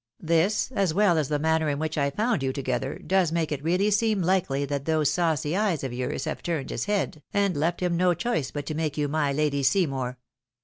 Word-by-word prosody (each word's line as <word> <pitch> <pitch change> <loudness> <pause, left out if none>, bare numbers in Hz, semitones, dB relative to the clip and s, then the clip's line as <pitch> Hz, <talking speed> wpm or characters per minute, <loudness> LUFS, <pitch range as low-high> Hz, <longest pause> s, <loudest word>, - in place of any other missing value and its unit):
This, 170 +9 +2
as 195 -9 0
well 200 -3 +4
as 145 - -1
the 150 - +1
manner 160 +1 +1
in 145 - -1
which 155 +1 -2
I 140 -2 +1
found 215 - 0
you 135 -1 0
together, 130 0 -2
does 185 -4 +2
make 165 -2 -1
it 145 -1 -3
really 180 +6 +2
seem 210 -2 +2
Ukely 165 -6 +1
that 140 0 -3
those 155 -3 +2
saucy 160 -2 0
eyes 195 -8 0
of 130 -2 -3
yours 125 +5 -3
have 155 - -4
turned 160 -6 -3
his - - -2
head, 205 -7 -1
and 200 -2 +2
left 165 +5 0
him 175 -1 +1
no 180 0 +3
choice 230 - -1
but 145 -1 -5
to 155 - -3
make 155 -1 -2
you 145 -1 +1
my 145 -1 0
Lady 145 0 0
Seymour. 135 -6 +1
160 Hz, 225 wpm, -26 LUFS, 140-185 Hz, -, well